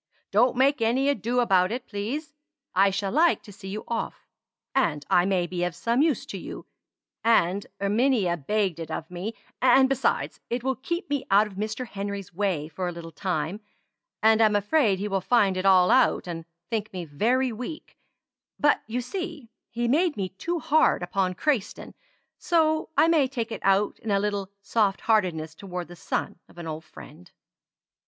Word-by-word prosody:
"Don't 240 Hz, +6 st, +4 dB
make 265 Hz, 0 st, +3 dB
any 255 Hz, +5 st, +2 dB
ado 245 Hz, -2 st, 0 dB
about 190 Hz, -5 st, +3 dB
it, 245 Hz, +1 st, -4 dB
please. 265 Hz, +10 st, -4 dB, 0.4 s
I 195 Hz, +2 st, +5 dB
shall 195 Hz, 0 st, -2 dB
like 330 Hz, +5 st, +3 dB
to 205 Hz, -, -12 dB
see 195 Hz, 0 st, -11 dB
you 205 Hz, +3 st, -5 dB
off; 230 Hz, -1 st, -4 dB, 0.5 s
and 155 Hz, -, +1 dB
I 175 Hz, -, +5 dB
may 185 Hz, -2 st, +1 dB
be 175 Hz, 0 st, -3 dB
of 175 Hz, -1 st, -2 dB
some 235 Hz, +8 st, +1 dB
use 310 Hz, -3 st, +1 dB
to -, -, -6 dB
you, -, -, -8 dB, 0.6 s
and 200 Hz, -4 st, +2 dB
Erminia 205 Hz, -2 st, +2 dB
begged 185 Hz, +2 st, -1 dB
it 165 Hz, -, -6 dB
of 160 Hz, +2 st, -5 dB
me; 190 Hz, +6 st, -5 dB, 0.3 s
and, 265 Hz, +1 st, +6 dB
besides, 270 Hz, -1 st, 0 dB
it 240 Hz, 0 st, -2 dB
will 265 Hz, 0 st, 0 dB
keep 340 Hz, -, -4 dB
me 285 Hz, -2 st, -2 dB
out 200 Hz, +2 st, +5 dB
of 210 Hz, -, -10 dB
Mr. 215 Hz, +5 st, -3 dB
Henry's 200 Hz, -2 st, -5 dB
way 180 Hz, -5 st, -1 dB
for 180 Hz, +3 st, -4 dB
a -, -, -2 dB
little 170 Hz, -1 st, -9 dB
time, 175 Hz, +2 st, -3 dB, 0.6 s
and 220 Hz, 0 st, +5 dB
I'm 215 Hz, -2 st, +4 dB
afraid 205 Hz, 0 st, +2 dB
he 200 Hz, +2 st, -3 dB
will 195 Hz, -2 st, -1 dB
find 200 Hz, -2 st, +3 dB
it 185 Hz, +1 st, 0 dB
all 185 Hz, -2 st, +6 dB
out, -, -, +4 dB
and 165 Hz, -2 st, -5 dB, 0.3 s
think 215 Hz, -2 st, -2 dB
me 180 Hz, -2 st, -5 dB
very 240 Hz, -, +1 dB
weak; 250 Hz, +7 st, -7 dB, 0.6 s
but 290 Hz, -, +3 dB
you 240 Hz, +3 st, -2 dB
see 320 Hz, -, -6 dB, 0.2 s
he 240 Hz, 0 st, -2 dB
made 315 Hz, +5 st, +2 dB
me 190 Hz, -2 st, -2 dB
too 335 Hz, -, -3 dB
hard 315 Hz, -, +3 dB
upon 185 Hz, 0 st, -1 dB
Crayston, 250 Hz, -, -1 dB, 0.5 s
so 315 Hz, -2 st, +2 dB
I 320 Hz, -, +6 dB
may 315 Hz, -5 st, +4 dB
take 240 Hz, -4 st, -4 dB
it -, -, -5 dB
out 195 Hz, +1 st, +2 dB
in 225 Hz, -, -6 dB
a 200 Hz, -1 st, +3 dB
little 200 Hz, -1 st, -2 dB
soft 200 Hz, -1 st, +1 dB
heartedness 180 Hz, -8 st, +1 dB
toward 180 Hz, 0 st, -7 dB
the 175 Hz, -, -10 dB
son 170 Hz, -, -3 dB
of -, -, -20 dB
an 170 Hz, -, -7 dB
old 160 Hz, 0 st, -6 dB
friend." 170 Hz, +3 st, -13 dB
210 Hz, 185 wpm, -26 LUFS, 185-250 Hz, 0.6 s, and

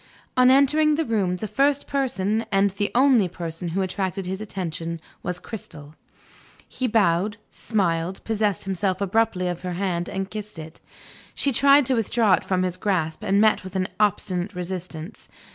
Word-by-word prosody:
On 255 Hz, 0 st, +6 dB
entering 295 Hz, +3 st, +4 dB
the 320 Hz, +1 st, 0 dB
room, 200 Hz, -7 st, 0 dB
the 215 Hz, +4 st, -4 dB
first 275 Hz, +5 st, +1 dB
person, 225 Hz, -6 st, 0 dB
and 195 Hz, 0 st, +3 dB
the 200 Hz, +1 st, -2 dB
only 250 Hz, -6 st, +5 dB
person, 170 Hz, 0 st, -6 dB
who 185 Hz, +4 st, -1 dB
attracted 190 Hz, 0 st, -3 dB
his 190 Hz, +3 st, -4 dB
attention 170 Hz, -5 st, -4 dB, 0.2 s
was 180 Hz, 0 st, -3 dB
Cristel. 155 Hz, -8 st, -9 dB, 0.7 s
He 255 Hz, -, -2 dB
bowed, 205 Hz, -1 st, +2 dB
smiled, 180 Hz, -4 st, -1 dB
possessed 210 Hz, -4 st, 0 dB
himself 190 Hz, 0 st, -1 dB
abruptly 200 Hz, -2 st, +1 dB
of 175 Hz, -1 st, -3 dB
her 180 Hz, -1 st, -4 dB
hand, 175 Hz, -2 st, -2 dB
and 195 Hz, 0 st, -4 dB
kissed 210 Hz, -3 st, -7 dB
it. 160 Hz, 0 st, -10 dB, 0.5 s
She 280 Hz, -, +1 dB
tried 280 Hz, +3 st, +5 dB
to 260 Hz, -, +2 dB
withdraw 225 Hz, -2 st, +2 dB
it -, -, +2 dB
from 185 Hz, -1 st, +1 dB
his 180 Hz, -1 st, -2 dB
grasp, 165 Hz, -6 st, -1 dB
and 200 Hz, +1 st, +2 dB
met 215 Hz, -2 st, +4 dB
with 185 Hz, 0 st, -9 dB
an 185 Hz, -1 st, 0 dB
obstinate 195 Hz, -2 st, 0 dB
resistance. 180 Hz, 0 st, -6 dB
195 Hz, 165 wpm, -24 LUFS, 180-225 Hz, 0.7 s, On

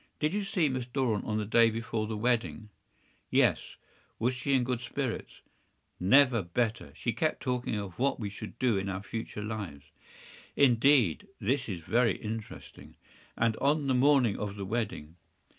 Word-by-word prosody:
Did 150 Hz, +3 st, 0 dB
you 205 Hz, 0 st, 0 dB
see 185 Hz, -5 st, +1 dB
Miss 130 Hz, -3 st, -3 dB
Doran 125 Hz, -4 st, 0 dB
on 105 Hz, -1 st, -1 dB
the 105 Hz, -, -1 dB
day 115 Hz, +2 st, +5 dB
before 115 Hz, -1 st, -3 dB
the 110 Hz, -1 st, -3 dB
wedding?” 115 Hz, -1 st, 0 dB, 0.6 s
“Yes.” -, -, +2 dB, 0.4 s
“Was 120 Hz, +4 st, +1 dB
she 135 Hz, +2 st, -1 dB
in 130 Hz, -, +3 dB
good 125 Hz, -1 st, -2 dB
spirits?” 125 Hz, 0 st, -4 dB, 0.6 s
“Never 125 Hz, +4 st, +5 dB
better. 110 Hz, +6 st, -2 dB
She 115 Hz, -, -2 dB
kept 155 Hz, -1 st, 0 dB
talking 125 Hz, -3 st, -1 dB
of 100 Hz, -3 st, -6 dB
what 140 Hz, +2 st, +1 dB
we 105 Hz, -3 st, -4 dB
should 105 Hz, -, -9 dB
do 120 Hz, -6 st, +2 dB
in 100 Hz, +1 st, -3 dB
our 95 Hz, +1 st, -4 dB
future 110 Hz, -1 st, -5 dB
lives.” 100 Hz, -10 st, -6 dB, 0.6 s
“Indeed! 125 Hz, -, +4 dB
That 130 Hz, +3 st, 0 dB
is 90 Hz, -4 st, -4 dB
very 115 Hz, +4 st, +2 dB
interesting. 110 Hz, 0 st, -8 dB, 0.4 s
And 115 Hz, -1 st, +2 dB
on 145 Hz, +1 st, +1 dB
the 135 Hz, -, +2 dB
morning 130 Hz, -4 st, +3 dB
of 100 Hz, -1 st, -4 dB
the 100 Hz, -1 st, -5 dB
wedding? 100 Hz, -7 st, -4 dB
115 Hz, 165 wpm, -30 LUFS, 105-130 Hz, 0.6 s, day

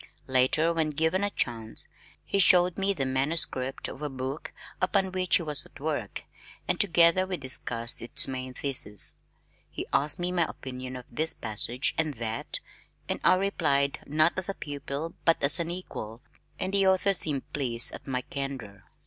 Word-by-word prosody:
Later, 130 Hz, +6 st, +2 dB
when 160 Hz, -2 st, 0 dB
given 160 Hz, +6 st, 0 dB
a 205 Hz, -, 0 dB
chance, 115 Hz, -, -1 dB, 0.4 s
he 200 Hz, -, 0 dB
showed 180 Hz, -2 st, +5 dB
me 195 Hz, 0 st, 0 dB
the 145 Hz, -9 st, -2 dB
manuscript 130 Hz, -1 st, -2 dB
of 135 Hz, -, -9 dB
a 150 Hz, -, -3 dB
book 135 Hz, +2 st, -6 dB, 0.3 s
upon 190 Hz, 0 st, +1 dB
which 185 Hz, -1 st, +1 dB
he 170 Hz, -, +1 dB
was 150 Hz, -2 st, -1 dB
at -, -, -15 dB
work 145 Hz, -8 st, -4 dB, 0.4 s
and -, -, -1 dB
together 175 Hz, -1 st, +4 dB
we 185 Hz, -1 st, -3 dB
discussed 125 Hz, -3 st, 0 dB
its 135 Hz, +4 st, +6 dB
main 130 Hz, -1 st, -6 dB
thesis. 120 Hz, -8 st, +1 dB, 0.6 s
He -, -, -6 dB
asked 150 Hz, +4 st, +2 dB
me 180 Hz, 0 st, -2 dB
my 175 Hz, -2 st, +2 dB
opinion 130 Hz, -1 st, -8 dB
of 125 Hz, -1 st, -8 dB
this 160 Hz, +1 st, +2 dB
passage 120 Hz, +3 st, -2 dB
and 155 Hz, -3 st, -1 dB
that 115 Hz, -1 st, -2 dB, 0.5 s
and -, -, -3 dB
I 185 Hz, -, +5 dB
replied, 140 Hz, -8 st, 0 dB
not 155 Hz, +3 st, +2 dB
as 185 Hz, 0 st, +1 dB
a 195 Hz, -, -2 dB
pupil 145 Hz, +2 st, -6 dB
but 165 Hz, -, +3 dB
as 140 Hz, +3 st, +6 dB
an 170 Hz, 0 st, -2 dB
equal, 125 Hz, -10 st, -7 dB, 0.4 s
and 190 Hz, -, -3 dB
the 195 Hz, -1 st, +3 dB
author 190 Hz, +1 st, +3 dB
seemed 150 Hz, -7 st, +2 dB
pleased 120 Hz, -5 st, +4 dB
at -, -, -10 dB
my 125 Hz, -2 st, -2 dB
candor. 125 Hz, -, -7 dB
145 Hz, 175 wpm, -27 LUFS, 130-175 Hz, 0.6 s, its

